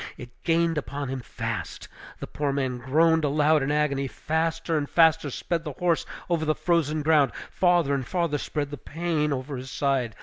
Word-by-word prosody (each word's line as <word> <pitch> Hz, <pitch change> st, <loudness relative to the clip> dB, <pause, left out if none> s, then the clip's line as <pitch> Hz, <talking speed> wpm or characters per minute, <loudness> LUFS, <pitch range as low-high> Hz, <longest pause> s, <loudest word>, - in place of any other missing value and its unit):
It 120 Hz, -1 st, -10 dB
gained 165 Hz, -1 st, +2 dB
upon 140 Hz, -1 st, -5 dB
him 135 Hz, 0 st, -3 dB
fast. 120 Hz, -, -5 dB, 0.3 s
The -, -, -3 dB
poor 145 Hz, -1 st, -2 dB
man 130 Hz, -3 st, -1 dB
groaned 160 Hz, +5 st, +3 dB
aloud 150 Hz, +1 st, +3 dB
in 135 Hz, +2 st, 0 dB
agony; 145 Hz, -2 st, +1 dB
faster 165 Hz, +3 st, -1 dB
and 145 Hz, -2 st, -1 dB
faster 160 Hz, -2 st, +4 dB
sped 165 Hz, +5 st, -3 dB
the 150 Hz, -3 st, -5 dB
horse 170 Hz, +3 st, 0 dB, 0.2 s
over 170 Hz, -3 st, 0 dB
the 155 Hz, 0 st, +1 dB
frozen 155 Hz, -3 st, 0 dB
ground, 150 Hz, -3 st, +4 dB, 0.2 s
farther 175 Hz, -6 st, +3 dB
and 135 Hz, -1 st, 0 dB
farther 165 Hz, 0 st, -1 dB
spread 145 Hz, -1 st, -3 dB
the 145 Hz, -, -5 dB
pain 155 Hz, +2 st, -1 dB
over 135 Hz, 0 st, -3 dB
his 130 Hz, +1 st, -7 dB
side. 130 Hz, -5 st, 0 dB
150 Hz, 180 wpm, -26 LUFS, 140-165 Hz, 0.3 s, faster